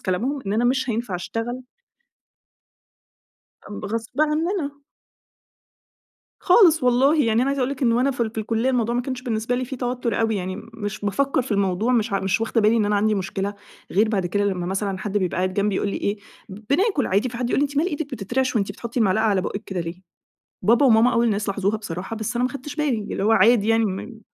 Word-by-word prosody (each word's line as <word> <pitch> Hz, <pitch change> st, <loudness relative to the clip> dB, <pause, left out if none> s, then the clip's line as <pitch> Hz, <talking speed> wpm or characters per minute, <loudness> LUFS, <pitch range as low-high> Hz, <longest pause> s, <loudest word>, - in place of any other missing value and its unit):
كلامهم 235 Hz, +11 st, -1 dB
إن 195 Hz, -, -1 dB
أنا 230 Hz, +3 st, +1 dB
مش 260 Hz, +1 st, +1 dB
هينفع 225 Hz, -4 st, -3 dB
أشتغل 225 Hz, +7 st, -4 dB, 2.2 s
ب -, -, -9 dB
غصب 230 Hz, +4 st, -3 dB
عننا. 310 Hz, -1 st, 0 dB, 1.6 s
خالص 355 Hz, -, +5 dB
والله، 265 Hz, +4 st, +4 dB
يعني 225 Hz, +2 st, +2 dB
أنا 270 Hz, -, +1 dB
عايزة 275 Hz, -1 st, -1 dB
أقول 255 Hz, -, 0 dB
لِك 275 Hz, -1 st, -5 dB
إن 235 Hz, -2 st, +4 dB
وأنا 255 Hz, +4 st, +2 dB
في 255 Hz, -, -6 dB
ال 220 Hz, -, -2 dB
في 225 Hz, -, -7 dB
الكلية 225 Hz, +4 st, 0 dB
الموضوع 235 Hz, -2 st, 0 dB
ما 245 Hz, -, +1 dB
كانش 255 Hz, 0 st, -5 dB
بالنسبة 230 Hz, -1 st, -1 dB
لي 255 Hz, +1 st, -1 dB
في 265 Hz, +2 st, -6 dB
توتر 245 Hz, -2 st, -2 dB
أوي، 225 Hz, -1 st, +1 dB
يعني 185 Hz, 0 st, -4 dB, 0.2 s
مش 205 Hz, -2 st, -5 dB
بافكّر 265 Hz, +6 st, +1 dB
في 240 Hz, -, -4 dB
الموضوع، 200 Hz, +4 st, +1 dB
مش 230 Hz, -2 st, +1 dB
ع 195 Hz, -, +1 dB
مش 190 Hz, +2 st, 0 dB
واخدة 225 Hz, 0 st, +1 dB
بالي 215 Hz, +2 st, +4 dB
إن 220 Hz, -, +2 dB
أنا 205 Hz, 0 st, +1 dB
عندي 215 Hz, +1 st, +2 dB
مشكلة، 195 Hz, +1 st, -3 dB, 0.4 s
غير 215 Hz, +4 st, +3 dB
بعد 195 Hz, -5 st, 0 dB
كده 205 Hz, +4 st, 0 dB
لما 185 Hz, -3 st, -1 dB
مثلًا 195 Hz, +1 st, -2 dB
حد 205 Hz, +1 st, -1 dB
بيبقى 185 Hz, -3 st, -2 dB
قاعد 185 Hz, 0 st, 0 dB
جنبي 200 Hz, 0 st, +1 dB
ويقول -, -, -1 dB
لي -, -, -3 dB
إيه 200 Hz, -, -1 dB, 0.3 s
ب 195 Hz, +1 st, -9 dB
بناكل 310 Hz, -, +2 dB
عادي 205 Hz, +7 st, +1 dB
في 240 Hz, -, -7 dB
حد 245 Hz, 0 st, -2 dB
يقول -, -, +2 dB
لي: -, -, +3 dB
"أنتِ 285 Hz, 0 st, -5 dB
مال 305 Hz, +4 st, +2 dB
إيدك 315 Hz, -4 st, -3 dB
بتترعش 255 Hz, +3 st, -1 dB
وأنتِ 200 Hz, -2 st, 0 dB
بتحطي 235 Hz, +4 st, -5 dB
المعلقة 215 Hz, 0 st, +2 dB
على 205 Hz, -3 st, +2 dB
بُقك 200 Hz, +2 st, -4 dB
كده 190 Hz, -3 st, -3 dB
ليه؟" 170 Hz, +2 st, -6 dB, 0.6 s
بابا 235 Hz, +8 st, +4 dB
وماما 230 Hz, 0 st, +5 dB
أول 235 Hz, 0 st, +2 dB
الناس 210 Hz, -1 st, 0 dB
لاحظوها 200 Hz, +1 st, 0 dB
بصراحة 190 Hz, 0 st, -6 dB
بس 220 Hz, +2 st, -3 dB
أنا 245 Hz, -, +1 dB
ما 255 Hz, -, 0 dB
خدتش 280 Hz, +2 st, -7 dB
بالي، 295 Hz, -7 st, 0 dB
اللي -, -, -2 dB
هُو 220 Hz, -, +4 dB
عادي 225 Hz, -1 st, +4 dB
يعني 225 Hz, 0 st, +3 dB
م 210 Hz, +3 st, -5 dB
225 Hz, 220 wpm, -23 LUFS, 200-255 Hz, 2.2 s, خالص